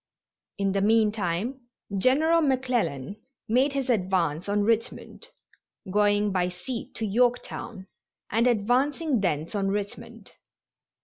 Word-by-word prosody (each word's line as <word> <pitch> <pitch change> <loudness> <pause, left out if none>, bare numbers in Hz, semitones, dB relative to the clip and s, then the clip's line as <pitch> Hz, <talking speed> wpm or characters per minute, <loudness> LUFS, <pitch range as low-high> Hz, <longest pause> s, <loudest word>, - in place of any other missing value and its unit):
In 195 -1 0
the 195 0 0
meantime 220 +2 0 0.3
General 300 - +3
McClellan 240 - -1 0.3
made 260 +5 +2
his 275 -1 -2
advance 185 - 0
on 205 0 +1
Richmond, 230 - -2 0.6
going 205 0 +2
by 180 -1 0
sea 205 +7 -6
to 225 - -3
Yorktown 235 -2 -1 0.5
and 230 +3 +3
advancing 250 +5 +1
thence 160 -3 -1
on 200 -2 0
Richmond. 205 +1 -5
210 Hz, 110 wpm, -26 LUFS, 195-250 Hz, 0.6 s, General